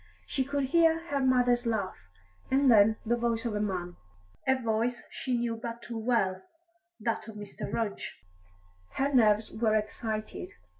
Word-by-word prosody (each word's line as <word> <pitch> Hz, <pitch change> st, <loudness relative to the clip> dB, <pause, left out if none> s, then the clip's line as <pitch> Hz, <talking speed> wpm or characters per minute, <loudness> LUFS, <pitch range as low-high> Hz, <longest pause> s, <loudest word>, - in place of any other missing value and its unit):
She 265 Hz, -, 0 dB
could 280 Hz, +1 st, -1 dB
hear 330 Hz, +3 st, +3 dB
her 285 Hz, -1 st, 0 dB
mother's 245 Hz, -2 st, +3 dB
laugh, 215 Hz, -5 st, -1 dB, 0.5 s
and 270 Hz, 0 st, +4 dB
then 220 Hz, 0 st, +6 dB
the 235 Hz, +2 st, +2 dB
voice 235 Hz, 0 st, -1 dB
of 230 Hz, -, -1 dB
a 210 Hz, -, -1 dB
man, 180 Hz, -4 st, -3 dB, 0.5 s
a 265 Hz, 0 st, +3 dB
voice 230 Hz, +1 st, 0 dB
she 255 Hz, -2 st, -2 dB
knew 235 Hz, -1 st, -1 dB
but 235 Hz, 0 st, -6 dB
too 230 Hz, -2 st, -5 dB
well 220 Hz, -5 st, +1 dB, 0.6 s
that 230 Hz, -2 st, -2 dB
of 220 Hz, -, -9 dB
Mr. 205 Hz, -1 st, -7 dB
Rudge. 220 Hz, -3 st, -2 dB, 0.8 s
Her 280 Hz, +1 st, 0 dB
nerves 215 Hz, -3 st, +4 dB
were 220 Hz, -1 st, +1 dB
excited. 215 Hz, -2 st, -3 dB
230 Hz, 155 wpm, -29 LUFS, 215-255 Hz, 0.8 s, then